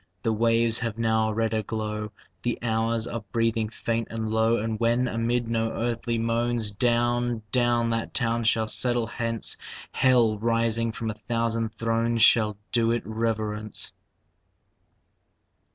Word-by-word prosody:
The 115 Hz, -, +1 dB
waves 115 Hz, +1 st, +2 dB
have 115 Hz, -2 st, -3 dB
now 110 Hz, -1 st, +2 dB
a -, -, -2 dB
redder 110 Hz, -1 st, 0 dB
glow; 105 Hz, 0 st, -4 dB, 0.3 s
The 120 Hz, -1 st, -1 dB
hours 115 Hz, 0 st, 0 dB
are 115 Hz, -2 st, -5 dB
breathing 115 Hz, -1 st, +1 dB
faint 115 Hz, 0 st, -2 dB
and 110 Hz, -1 st, -3 dB
low. 110 Hz, +1 st, +3 dB
And 110 Hz, 0 st, -2 dB
when, 120 Hz, +2 st, +2 dB
amid 120 Hz, +1 st, 0 dB
no 115 Hz, -1 st, 0 dB
earthly 115 Hz, 0 st, -1 dB
moans, 115 Hz, -1 st, 0 dB
Down, 120 Hz, +1 st, +1 dB
down 120 Hz, -2 st, +2 dB
that 115 Hz, 0 st, -2 dB
town 115 Hz, -1 st, 0 dB
shall 110 Hz, 0 st, +2 dB
settle 120 Hz, +1 st, +1 dB
hence, 115 Hz, 0 st, -1 dB, 0.3 s
Hell, 120 Hz, -5 st, +3 dB
rising 115 Hz, 0 st, +1 dB
from 110 Hz, 0 st, -3 dB
a 105 Hz, 0 st, -12 dB
thousand 115 Hz, -1 st, 0 dB
thrones, 115 Hz, 0 st, +1 dB
Shall 105 Hz, -3 st, +5 dB
do 115 Hz, -2 st, +2 dB
it 120 Hz, 0 st, 0 dB
reverence. 110 Hz, -1 st, -3 dB
115 Hz, 140 wpm, -26 LUFS, 110-115 Hz, 0.3 s, Shall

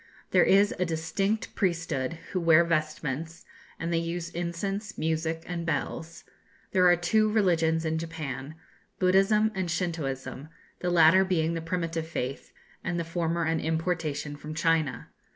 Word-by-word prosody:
There -, -, +6 dB
is 200 Hz, +2 st, +4 dB
a -, -, +3 dB
distinct 180 Hz, +6 st, -1 dB
priesthood 165 Hz, -7 st, -1 dB, 0.2 s
who 185 Hz, -, 0 dB
wear 165 Hz, 0 st, +6 dB
vestments, 155 Hz, -1 st, -2 dB, 0.3 s
and 165 Hz, +1 st, -2 dB
they 165 Hz, -, +2 dB
use 170 Hz, 0 st, -4 dB
incense, 195 Hz, +5 st, -3 dB
music, 160 Hz, 0 st, -1 dB
and 175 Hz, -1 st, -4 dB
bells. 165 Hz, +1 st, -3 dB, 0.5 s
There 185 Hz, -1 st, +5 dB
are 175 Hz, -, +6 dB
two 215 Hz, +5 st, +2 dB
religions 165 Hz, -6 st, +2 dB
in 160 Hz, 0 st, 0 dB
Japan, 155 Hz, -3 st, -5 dB, 0.4 s
Buddhism 195 Hz, +4 st, +3 dB
and 190 Hz, -3 st, -2 dB
Shintooism; 155 Hz, -5 st, -3 dB, 0.3 s
the 180 Hz, -, -1 dB
latter 175 Hz, +2 st, +6 dB
being 170 Hz, -3 st, +1 dB
the 165 Hz, -, -3 dB
primitive 165 Hz, -1 st, -2 dB
faith, 135 Hz, -4 st, -4 dB, 0.3 s
and 175 Hz, -1 st, -2 dB
the -, -, -1 dB
former 165 Hz, 0 st, -1 dB
an 160 Hz, 0 st, +1 dB
importation 160 Hz, -2 st, -2 dB
from 150 Hz, +1 st, -8 dB
China. 165 Hz, -3 st, 0 dB
165 Hz, 145 wpm, -28 LUFS, 160-180 Hz, 0.5 s, There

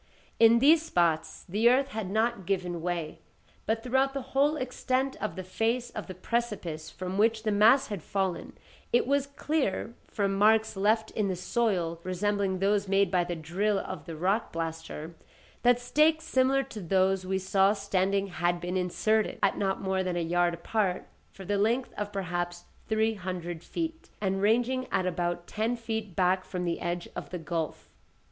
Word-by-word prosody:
In 230 Hz, 0 st, +7 dB
these 300 Hz, +6 st, +6 dB
spots 165 Hz, -, 0 dB
the 210 Hz, +6 st, +3 dB
earth 265 Hz, +2 st, +3 dB
had 220 Hz, -6 st, -4 dB
not 220 Hz, -2 st, 0 dB
given 180 Hz, -3 st, -1 dB
way, 170 Hz, -2 st, -3 dB, 0.5 s
but 225 Hz, +1 st, 0 dB
throughout 265 Hz, +2 st, +1 dB
the 275 Hz, -, -2 dB
whole 285 Hz, +3 st, +3 dB
extent 260 Hz, 0 st, -1 dB
of 215 Hz, -, -2 dB
the 185 Hz, -, -5 dB
face 230 Hz, +6 st, -1 dB
of 215 Hz, -, -6 dB
the 185 Hz, -, -7 dB
precipice 185 Hz, -7 st, -3 dB
from 185 Hz, +3 st, -5 dB
which 220 Hz, 0 st, +3 dB
the 215 Hz, -, +1 dB
mass 220 Hz, +7 st, +5 dB
had 205 Hz, -5 st, -4 dB
fallen, 190 Hz, +1 st, -3 dB, 0.3 s
it 240 Hz, -, +3 dB
was 280 Hz, +1 st, +1 dB
clear, 280 Hz, -7 st, -1 dB
from 200 Hz, -2 st, -1 dB
marks 220 Hz, +2 st, +3 dB
left 215 Hz, +3 st, +1 dB
in 210 Hz, -2 st, 0 dB
the 190 Hz, -, -1 dB
soil 180 Hz, -4 st, 0 dB
resembling 195 Hz, +1 st, 0 dB
those 200 Hz, +1 st, +1 dB
made 195 Hz, -1 st, +2 dB
by 180 Hz, -2 st, +3 dB
the 175 Hz, 0 st, -3 dB
drill 185 Hz, +6 st, 0 dB
of 185 Hz, -, -5 dB
the 165 Hz, -2 st, -6 dB
rock 190 Hz, +8 st, 0 dB
blaster, 165 Hz, -1 st, -5 dB, 0.5 s
that 245 Hz, 0 st, +4 dB
stakes 310 Hz, +5 st, +2 dB
similar 265 Hz, +1 st, +2 dB
to 245 Hz, -6 st, -8 dB
those 190 Hz, +1 st, +2 dB
we 190 Hz, +1 st, -1 dB
saw 190 Hz, +1 st, +3 dB
standing 200 Hz, -1 st, 0 dB
had 175 Hz, -2 st, -1 dB
been 175 Hz, +2 st, -2 dB
inserted, 215 Hz, +4 st, +1 dB
at -, -, +2 dB
not 195 Hz, -1 st, 0 dB
more 190 Hz, -1 st, 0 dB
than 185 Hz, -1 st, -2 dB
a -, -, 0 dB
yard 175 Hz, +1 st, +1 dB
apart, 185 Hz, +2 st, -1 dB, 0.2 s
for 190 Hz, -, -11 dB
the 205 Hz, +2 st, 0 dB
length 235 Hz, +5 st, +1 dB
of 205 Hz, 0 st, -4 dB
perhaps 175 Hz, -2 st, -3 dB, 0.2 s
three 220 Hz, 0 st, +2 dB
hundred 175 Hz, -4 st, -5 dB
feet, 325 Hz, -1 st, -5 dB
and 195 Hz, -1 st, -1 dB
ranging 245 Hz, +5 st, +2 dB
at 190 Hz, -2 st, +1 dB
about 175 Hz, -1 st, -2 dB
ten 225 Hz, +5 st, -1 dB
feet 220 Hz, -5 st, -4 dB
back 185 Hz, 0 st, +2 dB
from 180 Hz, -1 st, -4 dB
the 170 Hz, -1 st, -1 dB
edge 175 Hz, 0 st, -3 dB
of -, -, -6 dB
the 180 Hz, -, -4 dB
gulf. 165 Hz, -1 st, -4 dB
195 Hz, 180 wpm, -29 LUFS, 180-230 Hz, 0.5 s, In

